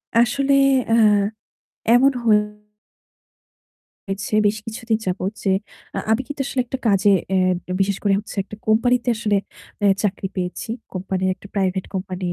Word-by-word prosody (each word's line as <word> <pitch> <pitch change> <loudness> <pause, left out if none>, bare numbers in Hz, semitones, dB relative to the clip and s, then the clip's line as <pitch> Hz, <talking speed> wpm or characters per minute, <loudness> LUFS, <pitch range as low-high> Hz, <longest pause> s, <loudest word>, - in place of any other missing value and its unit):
আসলে 270 +4 +3 0.4
অ্যা 225 - +4 1.0
এমন 270 +3 +5
হয়েছে 210 0 -1 1.6
বেশ 205 +1 +2
কিছুদিন 225 0 -2
যাবত 185 +2 -1
যে 195 - +2 0.5
আ - - 0
আমি 225 +3 +3
কিন্তু 290 -1 -7
আসলে 260 - -1
একটা 265 - -4
কাজে, 200 -1 +4 0.2
অ্যা 185 -1 0
বিশেষ 195 0 +2
করে 200 -2 +3
হচ্ছে 210 - -8
একটা 210 - -10
কোম্পানিতে 245 +3 +2
আসলে 210 -2 +1 0.4
অ্যা 205 - +3
চাকরি 195 -1 -1
পেয়েছি। 180 +4 -4 0.2
কোম্পানির 185 0 -1
একটা 195 - -14
private 190 -1 0
company 185 -1 -4
210 Hz, 135 wpm, -21 LUFS, 190-225 Hz, 1.6 s, এমন